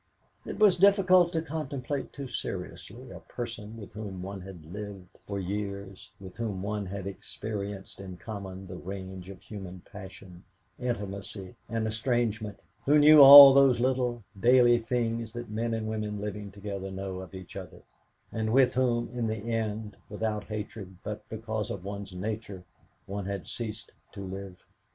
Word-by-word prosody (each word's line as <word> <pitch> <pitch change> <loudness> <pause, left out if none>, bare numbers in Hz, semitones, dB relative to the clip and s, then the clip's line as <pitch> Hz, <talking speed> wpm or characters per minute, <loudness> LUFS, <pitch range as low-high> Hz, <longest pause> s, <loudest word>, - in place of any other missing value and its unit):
It - - -5
was 205 -4 +5
difficult 185 -2 +5
to 160 -1 0
contemplate 145 -3 -4
too 140 -1 -7
seriously - - -6
a - - -9
person 115 -2 -7
with 105 -3 -10
whom 100 -3 -6
one 95 0 -6
had 90 -4 -10
lived 100 -3 -8
for 100 -1 -3
years, 100 0 -5
with 95 -2 -11
whom 105 -5 -3
one 105 -1 -2
had 100 0 -5
experienced 100 0 -6
in 95 -2 -8
common 95 -2 -7
the 90 -1 -8
range 95 -1 -7
of 95 -2 -11
human 95 -4 -8
passion, 95 -3 -12 0.4
intimacy, 100 -5 -5
and 115 0 -1
estrangement, 110 -2 -1 0.2
who 145 +2 +5
knew 150 0 +9
all 140 0 +13
those 135 -3 +5
little 125 -2 0 0.2
daily 120 +1 +6
things 115 -1 -2
that 120 -2 -7
men 115 +2 -1
and 110 -1 -3
women 105 -1 -3
living 105 0 -5
together 100 -1 -6
know 95 -1 -5
of 95 0 -9
each 95 -1 -10
other, - - -9 0.5
and 110 -1 -1
with 130 0 +5
whom 120 -2 +1
in 120 -2 -1
the 110 +1 -3
end, 110 -1 -3
without 105 0 -2
hatred, 105 -3 -6
but 105 0 -6
because 110 -1 -3
of 105 -6 -5
one's 100 -1 -6
nature, 100 -1 -5 0.4
one 100 0 -5
had 100 -2 -4
ceased 110 -3 -6 0.2
to 100 - -7
live. 95 -1 -8
105 Hz, 160 wpm, -29 LUFS, 95-120 Hz, 0.5 s, all